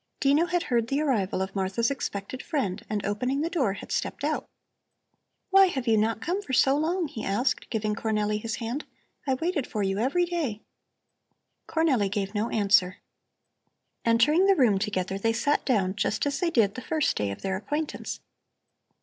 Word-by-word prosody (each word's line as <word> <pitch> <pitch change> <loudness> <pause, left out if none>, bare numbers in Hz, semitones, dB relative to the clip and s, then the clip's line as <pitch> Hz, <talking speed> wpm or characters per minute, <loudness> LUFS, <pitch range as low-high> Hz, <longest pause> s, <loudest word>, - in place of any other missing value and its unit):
Dino 290 +5 +3
had 350 -1 0
heard 235 -5 0
the 275 +4 0
arrival 215 -11 0
of 190 - -7
Martha's 195 +6 0
expected 250 -2 -4
friend 220 - -2
and 210 -2 -2
opening 250 +7 -1
the 330 +2 -1
door 260 - +1
had - - -9
stepped - - -2
out. - - -1 1.0
"Why 390 0 +7
have 265 -8 -3
you 225 - +4
not 220 +1 +1
come 365 +4 -1
for 270 - -7
so 270 +2 +4
long?" 330 +3 0
he 220 - -7
asked, 205 +7 0
giving 215 -2 -1
Cornelli 210 -1 -1
his 225 -1 -3
hand. 240 +5 -4 0.4
"I 265 - +2
waited 320 -1 -1
for 210 - -2
you 195 +1 0
every 280 +10 +2
day." 310 -12 -3 1.0
Cornelli 275 -11 +2
gave 200 0 -2
no 215 +2 -1
answer. 200 -3 +3 1.1
Entering 295 +11 +4
the 390 - +5
room 230 - +3
together 195 -2 -2
they 225 +3 +1
sat 285 +6 +1
down 195 -7 +1
just 205 - 0
as 285 -1 -1
they 355 - +1
did 220 -9 +2
the 255 - -6
first 315 +1 0
day 105 -1 -1
of 100 - -7
their 190 -1 -1
acquaintance. 295 +10 -4
230 Hz, 180 wpm, -27 LUFS, 205-295 Hz, 1.1 s, Why